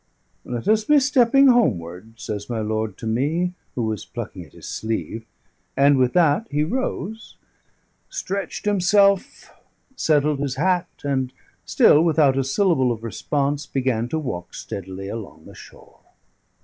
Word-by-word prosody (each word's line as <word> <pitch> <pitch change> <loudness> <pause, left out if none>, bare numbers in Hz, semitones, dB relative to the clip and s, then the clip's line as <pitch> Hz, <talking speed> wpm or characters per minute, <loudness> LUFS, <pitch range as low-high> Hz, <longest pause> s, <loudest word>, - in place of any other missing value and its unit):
"Let 120 +4 -5
us 215 0 +3
be 295 +6 +5
stepping 275 0 +4
homeward," 110 - 0
says 105 0 -5
my 115 -2 -2
lord 110 -1 -2
to - - -8
me, 150 +11 0 0.2
who 120 - -1
was 110 -1 -2
plucking 110 -6 -7
at - - -25
his - - -11
sleeve; 115 0 -4 0.5
and 140 +1 +5
with 125 -1 +2
that 175 +5 +3
he 150 +1 0
rose, 220 +1 -4 0.7
stretched 195 -1 -4
himself, 200 0 +2 0.4
settled 150 - +2
his 140 -2 -2
hat, 180 +4 +1
and, 130 -3 -1 0.3
still 150 - +5
without 155 -5 +3
a 135 - +1
syllable 135 -3 +2
of 115 -1 -5
response, 140 +5 -2
began 125 -4 -1
to 160 - -1
walk 120 - -5
steadily 95 0 -7
along 100 -7 -8
the - - -13
shore. - - -16
140 Hz, 145 wpm, -22 LUFS, 115-180 Hz, 0.7 s, be